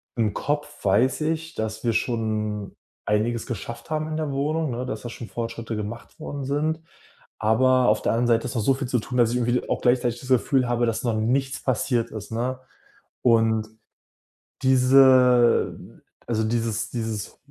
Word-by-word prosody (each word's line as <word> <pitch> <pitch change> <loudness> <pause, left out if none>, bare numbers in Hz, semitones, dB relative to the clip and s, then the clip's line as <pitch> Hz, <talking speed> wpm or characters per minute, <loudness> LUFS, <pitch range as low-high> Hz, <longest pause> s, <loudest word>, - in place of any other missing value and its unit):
im 110 -4 0
Kopf 145 -3 -3
weiß 125 +9 +3
ich, 160 +1 -2
dass 110 0 -4
wir 120 - +2
schon 110 -3 -2 0.3
einiges 110 +2 0
geschafft 120 +2 -6
haben 155 0 -1
in 155 - -4
der 155 -2 -2
Wohnung, 150 +3 -1
ne, 125 +2 -3
dass 110 -4 -5
da 120 - -6
schon 115 0 -8
Fortschritte 115 -1 -5
gemacht 105 +2 -7
worden 140 -1 -5
sind. 155 +3 -1 0.6
Aber 130 +3 +3
auf 105 0 +3
der - - +1
anderen 120 +2 +1
Seite 115 0 +2
ist 125 - -5
noch 115 - 0
so 135 - +4
viel 135 -1 -4
zu 125 - +1
tun, 125 +3 -4
dass 120 -2 +4
ich - - 0
irgendwie 120 +1 0
auch - - -1
gleichzeitig 120 -1 +2
das 130 - -10
Gefühl 130 +1 +3
habe, 120 0 +1
dass 115 +1 -2
noch 115 -2 +1
nichts 135 +4 0
passiert 120 -1 0
ist, 110 0 -8
ne? 125 +3 -2 0.6
Und 110 -2 +3 1.0
diese 130 -2 +5 0.5
also, 110 -2 0
dieses 115 -1 -1
dieses 110 -3 -4
120 Hz, 175 wpm, -24 LUFS, 110-130 Hz, 1.0 s, diese